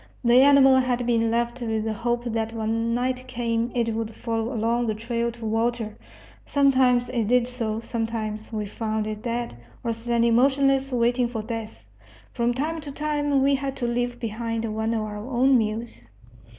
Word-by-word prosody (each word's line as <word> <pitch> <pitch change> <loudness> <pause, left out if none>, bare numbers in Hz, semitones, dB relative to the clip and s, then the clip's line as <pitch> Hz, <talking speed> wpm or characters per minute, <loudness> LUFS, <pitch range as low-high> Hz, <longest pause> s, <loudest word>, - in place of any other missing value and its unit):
The 240 +1 +6
animal 270 -1 +7
had 250 -1 +1
been 230 -1 +2
left 235 +2 -1
with 220 -2 -1
the 220 0 -1
hope 240 +2 -1
that 225 -1 -2
when 225 +1 -1
night 255 +1 -2
came 235 -1 -1
it 230 -2 +1
would 225 0 -4
follow 230 0 -2
along 235 0 0
the 215 - 0
trail 235 +1 -2
to 235 -1 -9
water. 225 0 -1 0.5
Sometimes 260 -3 +3
it 235 -4 -1
did 245 +1 +3
so. 225 -3 -3
Sometimes 225 -2 -4
we 215 -2 -2
found 215 +1 -2
it 215 0 -5
dead, 235 - -3 0.3
or 230 - 0
standing 235 0 +1
motionless 275 +1 +3
waiting 245 0 +2
for 225 -2 -4
death. 225 -1 -6 0.5
From 235 -1 +1
time 310 +6 -2
to 295 -2 -7
time 290 -1 0
we 280 +1 +4
had 275 0 -2
to 250 - -3
leave 245 0 -1
behind 230 0 -3
one 220 +1 0
of 220 - 0
our 210 -1 -5
own 255 +4 +2
mules. 215 - -2
235 Hz, 175 wpm, -25 LUFS, 225-250 Hz, 0.5 s, animal